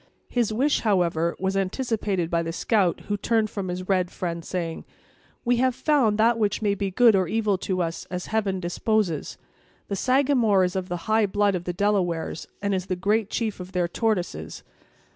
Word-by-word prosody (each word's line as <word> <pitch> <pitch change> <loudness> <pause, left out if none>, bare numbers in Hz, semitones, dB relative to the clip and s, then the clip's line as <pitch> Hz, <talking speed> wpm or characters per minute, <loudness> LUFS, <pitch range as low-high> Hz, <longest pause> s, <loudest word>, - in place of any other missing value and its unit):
His 240 -3 0
wish, 270 +7 +2
however, 170 -5 +1
was 190 +1 -1
anticipated 195 -3 -1
by 170 -1 +2
the 165 0 -3
scout 185 0 +1
who 205 - -3
turned 220 0 +1
from 195 -2 -4
his 180 +1 -4
red 185 -2 +1
friend, 170 -2 -4
saying: 170 -2 -4 0.6
"We 245 0 +3
have 255 0 +2
found 260 -10 +2
that 230 +1 +3
which 210 -2 +1
may 205 -2 +1
be 200 0 -2
good 225 +3 +5
or 185 -2 +2
evil 215 0 +1
to 185 -2 -1
us, 165 0 -4
as 180 0 -5
heaven 200 -4 -1
disposes. 180 -1 -1 0.5
The 200 - -1
Sagamore 255 -4 +3
is 180 +1 -1
of 185 -1 -3
the 175 -1 -4
high 220 -1 +3
blood 205 +1 +2
of 175 -1 -3
the 180 - -1
Delawares, 180 -5 -1 0.2
and 200 0 +1
is 185 0 -2
the 185 - -1
great 210 +3 +1
chief 220 -4 -2
of 180 +1 -9
their 180 -1 +1
Tortoises! 200 -1 -2
195 Hz, 190 wpm, -25 LUFS, 180-220 Hz, 0.6 s, good